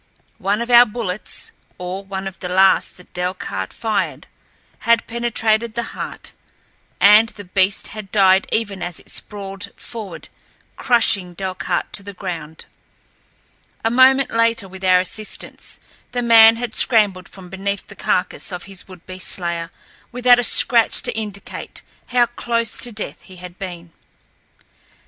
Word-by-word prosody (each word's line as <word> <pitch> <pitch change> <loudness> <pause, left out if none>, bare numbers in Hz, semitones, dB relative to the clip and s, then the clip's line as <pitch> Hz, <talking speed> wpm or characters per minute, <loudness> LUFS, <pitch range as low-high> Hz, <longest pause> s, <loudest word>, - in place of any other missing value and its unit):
One 205 +4 0
of 240 - -5
our 240 0 +8
bullets, 210 -3 -4 0.3
or 180 +2 -5
one 195 0 -5
of 190 - -8
the 180 - -5
last 190 +1 +3
that 180 - -18
Delcarte 180 - -4
fired, 220 -2 -2 0.5
had 230 -1 +2
penetrated 230 -1 0
the 235 - -1
heart, - - -7 0.7
and 210 +3 +7
the 205 - -10
beast 190 +1 0
had 210 -3 -9
died 190 -2 +4
even 205 -4 -1
as 175 -1 -4
it - - -12
sprawled 195 -1 -5
forward 210 -7 -8 0.5
crushing 200 -7 +2
Delcarte 185 -2 -3
to - - +2
the 200 0 -10
ground. 165 -5 -6 1.2
A 225 - +2
moment 260 +2 +5
later, 230 -2 +2
with 190 0 -12
our 185 -1 +5
assistance, 215 +3 -5 0.3
the 245 0 -1
man 225 -1 +8
had 235 -1 -4
scrambled 205 -6 +3
from 185 -2 -12
beneath 195 +1 -3
the - - -14
carcass 180 - -1
of 180 -1 -6
his 195 -2 -9
would 185 -2 -14
be 185 0 -9
slayer, 170 -2 -1 0.4
without 245 0 +5
a - - +1
scratch 235 0 +4
to - - -2
indicate 210 -2 -6 0.2
how 245 -1 +3
close 235 -2 -2
to 245 - -3
death 215 -1 -5
he 185 - -15
had 180 0 -11
been. 175 -3 -8
200 Hz, 150 wpm, -20 LUFS, 185-230 Hz, 1.2 s, our